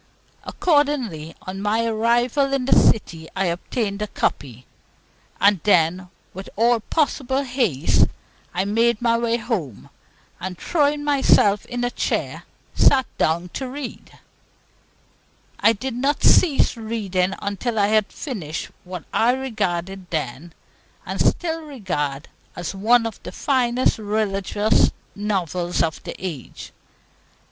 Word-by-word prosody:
Accordingly, 290 Hz, -, 0 dB
on 190 Hz, +1 st, -6 dB
my 220 Hz, +3 st, +1 dB
arrival 240 Hz, +5 st, +1 dB
in 270 Hz, -2 st, 0 dB
the 270 Hz, -, +4 dB
City, 165 Hz, -7 st, +2 dB
I 195 Hz, 0 st, +1 dB
obtained 200 Hz, +4 st, -2 dB
a 210 Hz, -, -1 dB
copy; 125 Hz, -, -3 dB, 0.7 s
and 200 Hz, -2 st, +4 dB
then, 180 Hz, -1 st, +2 dB, 0.2 s
with 190 Hz, +1 st, -8 dB
all 235 Hz, +2 st, +3 dB
possible 270 Hz, +1 st, 0 dB
haste, 245 Hz, -, +2 dB, 0.4 s
I 185 Hz, +2 st, -1 dB
made 230 Hz, +2 st, +2 dB
my 235 Hz, -1 st, +2 dB
way 235 Hz, 0 st, +1 dB
home, 185 Hz, -, -4 dB, 0.5 s
and, 185 Hz, 0 st, -5 dB
throwing 295 Hz, -, +1 dB
myself 265 Hz, -8 st, +3 dB
in 245 Hz, 0 st, -3 dB
a 245 Hz, -, 0 dB
chair, -, -, -2 dB, 0.3 s
sat 265 Hz, -2 st, +4 dB
down 170 Hz, +3 st, +1 dB
to 260 Hz, +7 st, -5 dB
read 275 Hz, -1 st, -7 dB
it. -, -, -20 dB, 1.4 s
I 225 Hz, -, +5 dB
did 250 Hz, +4 st, -4 dB
not 275 Hz, +5 st, 0 dB
cease 305 Hz, -8 st, +4 dB
reading 200 Hz, -5 st, -1 dB
until 205 Hz, +3 st, -3 dB
I 205 Hz, -1 st, +3 dB
had 215 Hz, -1 st, +2 dB
finished 175 Hz, -, -5 dB
what 180 Hz, 0 st, -7 dB
I 235 Hz, +2 st, +3 dB
regarded 195 Hz, -8 st, -3 dB
then, 160 Hz, +1 st, -4 dB, 0.5 s
and -, -, -3 dB
still 325 Hz, -1 st, 0 dB
regard, 180 Hz, -, -4 dB, 0.3 s
as 175 Hz, +2 st, -4 dB
one 230 Hz, +4 st, +3 dB
of 225 Hz, -2 st, -5 dB
the 180 Hz, -, -8 dB
finest 250 Hz, +1 st, +1 dB
religious 205 Hz, 0 st, +1 dB, 0.3 s
novels 180 Hz, -4 st, -1 dB
of 160 Hz, -2 st, -2 dB
the -, -, -6 dB
age. 165 Hz, -9 st, -7 dB
215 Hz, 130 wpm, -22 LUFS, 180-245 Hz, 1.4 s, I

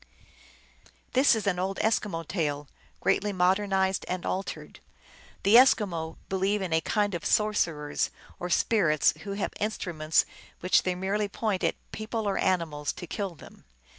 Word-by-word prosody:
This 260 Hz, -1 st, +5 dB
is 220 Hz, -, -3 dB
an 185 Hz, -3 st, 0 dB
old 195 Hz, +1 st, -2 dB
Eskimo 195 Hz, -7 st, 0 dB
tale, 150 Hz, -5 st, -2 dB, 0.3 s
greatly 205 Hz, +1 st, +1 dB
modernized 190 Hz, +1 st, +1 dB
and 180 Hz, -1 st, -3 dB
altered. 190 Hz, +1 st, -4 dB, 0.6 s
The 200 Hz, -, +3 dB
Eskimo 185 Hz, -11 st, +3 dB
believe 195 Hz, +2 st, 0 dB
in 175 Hz, -3 st, -2 dB
a 160 Hz, -, +3 dB
kind 205 Hz, +1 st, 0 dB
of 170 Hz, -, -4 dB
sorcerers 165 Hz, -9 st, +1 dB, 0.3 s
or 180 Hz, -, -4 dB
spirits, 170 Hz, -6 st, +3 dB
who 200 Hz, -, -5 dB
have 200 Hz, -, -3 dB
instruments 170 Hz, -7 st, 0 dB, 0.3 s
which 180 Hz, -, +3 dB
they 185 Hz, -1 st, -1 dB
merely 200 Hz, +3 st, -1 dB
point 200 Hz, -1 st, -2 dB
at -, -, +1 dB, 0.2 s
people 220 Hz, 0 st, -3 dB
or 200 Hz, -, 0 dB
animals, 160 Hz, -6 st, 0 dB
to -, -, -8 dB
kill 195 Hz, -1 st, -4 dB
them. -, -, -15 dB
190 Hz, 145 wpm, -28 LUFS, 170-210 Hz, 0.6 s, This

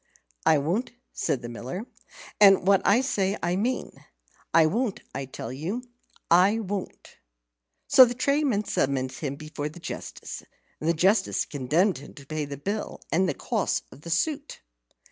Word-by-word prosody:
"I 155 Hz, -, +6 dB
won't," 180 Hz, -, -1 dB, 0.2 s
said 130 Hz, -3 st, -1 dB
the -, -, -4 dB
Miller, 130 Hz, -, -6 dB, 0.5 s
"and 195 Hz, -3 st, +7 dB
what 195 Hz, 0 st, +5 dB
I 210 Hz, +5 st, +4 dB
say 200 Hz, -6 st, 0 dB
I 175 Hz, +1 st, +1 dB
mean. 235 Hz, +7 st, -2 dB, 0.5 s
I 165 Hz, -1 st, +6 dB
won't; 215 Hz, +6 st, -1 dB
I 135 Hz, -, -4 dB
tell 125 Hz, -2 st, -7 dB
you, 180 Hz, -, -4 dB, 0.5 s
I 185 Hz, +5 st, +6 dB
won't." 200 Hz, -3 st, -5 dB, 0.7 s
So 275 Hz, -2 st, +9 dB
the 245 Hz, 0 st, -3 dB
tradesman 280 Hz, -5 st, +1 dB
summoned 130 Hz, -8 st, 0 dB
him 140 Hz, -1 st, -4 dB
before 150 Hz, 0 st, -5 dB
the 155 Hz, -, -12 dB
Justice, -, -, -7 dB, 0.4 s
and 155 Hz, -, -1 dB
the 170 Hz, -, +3 dB
Justice 190 Hz, +7 st, +2 dB
condemned 155 Hz, +7 st, +1 dB
him 140 Hz, -, -13 dB
to 140 Hz, -, -12 dB
pay 155 Hz, +1 st, -3 dB
the 140 Hz, 0 st, -7 dB
bill 200 Hz, +9 st, -4 dB
and 185 Hz, +2 st, +2 dB
the -, -, -2 dB
costs -, -, -1 dB
of 140 Hz, -, -14 dB
the 170 Hz, -, -8 dB
suit. 290 Hz, -, -1 dB
180 Hz, 165 wpm, -26 LUFS, 145-215 Hz, 0.7 s, So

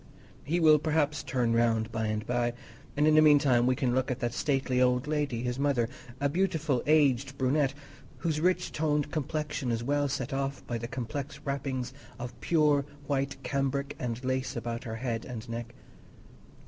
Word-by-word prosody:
He 170 Hz, +4 st, 0 dB
will 155 Hz, -2 st, +6 dB
perhaps 150 Hz, -1 st, +1 dB
turn 120 Hz, -3 st, 0 dB
round 115 Hz, -1 st, +2 dB
by 110 Hz, -1 st, -1 dB
and 110 Hz, +1 st, -2 dB
by, 120 Hz, -1 st, 0 dB, 0.4 s
and 150 Hz, -, +4 dB
in 155 Hz, -, +5 dB
the 155 Hz, -, +7 dB
meantime 140 Hz, -5 st, +5 dB
we 130 Hz, -, +3 dB
can 130 Hz, -3 st, 0 dB
look 130 Hz, 0 st, +1 dB
at 125 Hz, -, -1 dB
that 120 Hz, -1 st, -1 dB
stately 135 Hz, -3 st, +1 dB
old 125 Hz, +1 st, +3 dB
lady, 145 Hz, -6 st, -1 dB
his 125 Hz, +1 st, -2 dB
mother, 140 Hz, -5 st, +2 dB, 0.3 s
a 140 Hz, -, +2 dB
beautiful 155 Hz, -5 st, 0 dB
aged 140 Hz, -3 st, +3 dB
brunette, 135 Hz, +1 st, +1 dB, 0.4 s
whose 155 Hz, -3 st, -1 dB
rich 180 Hz, +1 st, +1 dB
toned 150 Hz, -2 st, 0 dB
complexion 150 Hz, -3 st, -2 dB
is 115 Hz, 0 st, -1 dB
well 145 Hz, +2 st, +1 dB
set 135 Hz, -1 st, -3 dB
off 135 Hz, 0 st, -2 dB
by 120 Hz, -1 st, -3 dB
the 115 Hz, -, -4 dB
complex 135 Hz, +3 st, -5 dB
wrappings 135 Hz, -2 st, -2 dB, 0.2 s
of 120 Hz, -1 st, -6 dB
pure 150 Hz, -4 st, +3 dB, 0.2 s
white 140 Hz, 0 st, -1 dB
cambric 140 Hz, +1 st, -1 dB
and 120 Hz, 0 st, -3 dB
lace 130 Hz, 0 st, -1 dB
about 115 Hz, 0 st, -4 dB
her 110 Hz, -1 st, -4 dB
head 115 Hz, -1 st, -3 dB
and 120 Hz, -4 st, -7 dB
neck. 115 Hz, +1 st, -6 dB
135 Hz, 175 wpm, -29 LUFS, 120-145 Hz, 0.4 s, the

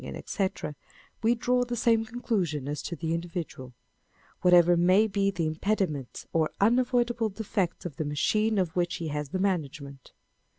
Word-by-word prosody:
&c, -, -, -7 dB, 1.1 s
wTe 235 Hz, +2 st, +3 dB
draw 250 Hz, +2 st, +2 dB
the 245 Hz, 0 st, -3 dB
same 230 Hz, -1 st, +3 dB
conclusion 195 Hz, -, -2 dB
as 145 Hz, 0 st, -3 dB
to 170 Hz, -, -5 dB
the 165 Hz, -1 st, -2 dB
individual, 165 Hz, -5 st, -5 dB
â€" -, -, -20 dB, 0.7 s
whatever 175 Hz, -1 st, +6 dB
may 185 Hz, +5 st, +4 dB
be 200 Hz, -2 st, +1 dB
the 175 Hz, -4 st, -2 dB
impediments 155 Hz, -, -2 dB
or 160 Hz, -1 st, +2 dB
unavoidable 240 Hz, +1 st, +2 dB
defects 195 Hz, -4 st, -2 dB
in 175 Hz, -, -4 dB
the -, -, -1 dB
machine 215 Hz, +9 st, +1 dB
of 180 Hz, -4 st, 0 dB
which 175 Hz, -1 st, 0 dB
he 165 Hz, -3 st, -4 dB
has 150 Hz, -1 st, -3 dB
the 185 Hz, -, -2 dB
management. 150 Hz, -8 st, -3 dB
180 Hz, 160 wpm, -28 LUFS, 155-220 Hz, 1.1 s, whatever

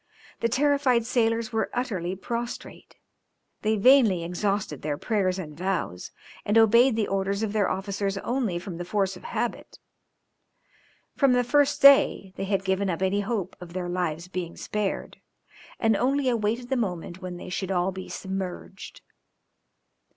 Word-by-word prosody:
The 230 Hz, -, +1 dB
terrified 265 Hz, -2 st, +2 dB
sailors 230 Hz, -2 st, 0 dB
were 220 Hz, -1 st, 0 dB
utterly 190 Hz, -8 st, -2 dB
prostrate; 235 Hz, +5 st, -6 dB, 0.7 s
they 215 Hz, 0 st, +1 dB
vainly 220 Hz, -6 st, +5 dB
exhausted 180 Hz, -3 st, -2 dB
their 145 Hz, -1 st, -2 dB
prayers 190 Hz, -1 st, 0 dB
and 155 Hz, -5 st, -7 dB
vows, 175 Hz, -, -3 dB, 0.3 s
and 210 Hz, +2 st, +2 dB
obeyed 235 Hz, +3 st, +6 dB
the 220 Hz, -2 st, 0 dB
orders 195 Hz, +2 st, -1 dB
of 215 Hz, -2 st, -2 dB
their 210 Hz, -3 st, +2 dB
officers 195 Hz, +1 st, -2 dB
only 235 Hz, -4 st, -1 dB
from 175 Hz, -1 st, -6 dB
the 175 Hz, -, -4 dB
force 195 Hz, +1 st, -1 dB
of -, -, -12 dB
habit; 475 Hz, -, -4 dB, 1.4 s
from 275 Hz, -3 st, +4 dB
the 245 Hz, 0 st, +3 dB
first 290 Hz, +3 st, +2 dB
day 275 Hz, -8 st, +6 dB
they 195 Hz, -, -3 dB
had 195 Hz, -1 st, -1 dB
given 190 Hz, +1 st, 0 dB
up 180 Hz, +1 st, -2 dB
any 190 Hz, +2 st, +1 dB
hope 200 Hz, -3 st, -2 dB
of 170 Hz, -1 st, -10 dB
their 180 Hz, -1 st, -3 dB
lives 175 Hz, -2 st, -2 dB
being 180 Hz, -2 st, -5 dB
spared, 210 Hz, -2 st, -3 dB, 0.6 s
and 225 Hz, -2 st, +3 dB
only 270 Hz, +3 st, +1 dB
awaited 235 Hz, +1 st, -1 dB
the 265 Hz, -, +1 dB
moment 180 Hz, -4 st, -3 dB
when 180 Hz, -1 st, -6 dB
they 180 Hz, -, -8 dB
should 190 Hz, +1 st, -3 dB
all 185 Hz, 0 st, +1 dB
be 190 Hz, 0 st, -8 dB
submerged. 190 Hz, 0 st, -6 dB
200 Hz, 155 wpm, -26 LUFS, 185-235 Hz, 1.4 s, obeyed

